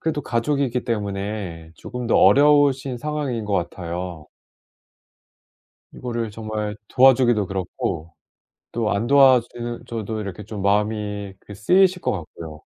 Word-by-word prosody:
그래도 155 -2 -2
가족이기 125 +1 0
때문에 100 -6 -4
조금 125 -1 -6
더 - - +4
어려우신 140 -3 +4
상황인 145 -5 -3
것 105 - -4
같아요. 85 -2 -4 1.7
이거를 115 -3 -4
정말 110 -1 -4
도와주기도 125 -5 +4
그렇고 90 -3 -4 0.6
또 115 -2 -1
안 100 +4 -1
도와주 130 -3 +6 0.4
줘도 110 -1 -4
이렇게 100 -1 -6
좀 105 -1 -7
마음이 105 0 -1
그 105 - -12
쓰이실 180 - +3
것 - - 0
같고요. 80 -3 -8
110 Hz, 275 characters per minute, -22 LUFS, 100-130 Hz, 1.7 s, 도와주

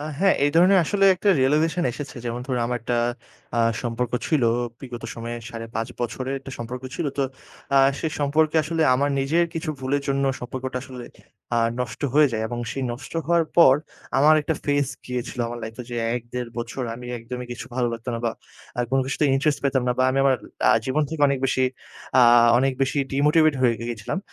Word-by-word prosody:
আ - - -5 0.2
হ্যাঁ, 195 0 +4
এই 145 - +3
ধরনের 185 +3 +6
আসলে 195 +4 +1
একটা 195 +3 -1
realization 155 +6 +2
এসেছে। 145 0 -7
যেমন 120 +1 -3
ধরুন 125 -3 -1
আমার 120 0 -1
একটা 120 0 -1 0.6
অ্যা 120 - +2 0.2
সম্পর্ক 120 0 -2
ছিল, 150 -6 +1 0.4
বিগত 125 -3 -8
সময়ে 115 +1 -5
৫.৫ 115 -1 -5
বছরের 130 +3 -3
একটা 135 - -10
সম্পর্ক 125 +2 -6
ছিল। 165 - -2
তো - - +3 0.5
আ - - +8 0.2
সে - - -2
সম্পর্কে 155 +2 +2
আসলে 160 +1 -1
আ - - +5
আমার 140 +2 +1
নিজের 165 +6 +2
কিছু 165 -1 -2
ভুলের 140 +2 -1
জন্য 140 0 +1 0.2
সম্পর্কটা 130 +1 -5
আসলে 125 -3 -9 0.5
আ - - +4 0.2
নষ্ট 110 -4 -4
হয়ে 150 -1 +6
যায় 110 0 -1
এবং 120 +1 -4
সেই 135 - -3
নষ্ট 120 - -9
হওয়ার 170 0 +3
পর 135 -6 +8 0.4
আমার 155 +3 +6
একটা 160 +2 -1
phase 145 -1 +1 0.2
গিয়েছিল 125 -1 -4
আমার 120 0 -6
life-এ 110 +3 -7
যে 120 - -4 0.2
১-১.৫ 120 0 -5
বছর 120 +2 -4
আমি 125 +1 -9
একদমই 125 +2 -7
কিছু 120 - -8
ভালো 125 -2 +1
লাগতো 115 +2 -7
না 115 - -3
বা 115 - +1 0.5
আর 120 - +2
কোনো 135 0 +3
কিছুতে 140 +2 0
interest 145 +1 +1
পেতাম 135 -2 +2
না 125 - +3
বা 130 - +4
আমি 135 - 0
আমার 135 -2 +4 0.3
আ - - +6
জীবন 140 +4 +1
থেকে 160 -2 -5
অনেক 140 - 0
বেশি 130 0 +1 0.6
আ - - +7 0.4
অনেক 135 +1 +2
বেশি 135 +2 0
demotivated 150 +1 +4
হয়ে 120 -2 +4
গিয়েছিলাম 115 - -4
130 Hz, 195 wpm, -24 LUFS, 120-150 Hz, 0.6 s, আ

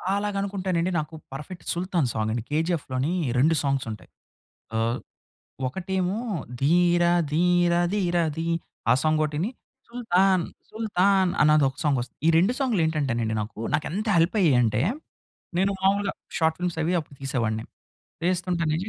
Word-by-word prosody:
అలాగా 205 0 -1
అనుకుంటేనండి. 185 -3 -1
నాకు 155 +1 -6 0.2
పర్ఫెక్ట్ 150 +6 -8
'సుల్తాన్' 175 -6 0
సాంగ్ 110 0 -1
అండి. 115 -1 -2
'కేజీఎఫ్‌లోని' 155 -2 0 0.3
2 160 +5 +4
సాంగ్స్ 135 -2 0
ఉంటాయి. 105 - -10 0.7
ఆహ్, 115 +3 0 0.7
ఒకటేమో 190 +5 -2 0.4
'ధీర 175 +4 +4 0.3
ధీర 175 +1 +3 0.2
ధీర 180 -4 0 0.2
ధీ' 165 +1 -2 0.4
ఆ - - +8
సాంగ్ 155 0 +2
ఒకటీని 155 +7 -2 0.4
'సుల్తాన్ 195 -6 +2 0.3
సుల్తాన్' 195 -4 +2
అన్నది 150 -1 +5
ఒక 135 - -8
సాంగ్ 145 -3 +2
వస్తుంది. 120 +1 -8
ఈ - - +5
2 190 +8 +3
సాంగ్‌లు 245 -9 +1
ఏంటంటేనండి 125 -8 -1
నాకు 105 0 -9 0.2
నాకు 145 - +1
ఎంత 210 +5 -2
హెల్ప్ 165 +4 +2
అయ్యాయి 150 -9 +4
అంటే 110 -1 +1 0.8
నేను 195 +2 +2
మామూలుగా 195 +1 +2 0.3
షార్ట్ 160 -1 +2
ఫిల్మ్స్ 180 -2 -2
అవి 165 +3 0
అప్పుడు 150 -2 -13
తీసేవాడిని. 115 -5 -1 0.6
చేస్తుంటేనే 175 -3 0
170 Hz, 140 wpm, -25 LUFS, 140-185 Hz, 0.8 s, ఆ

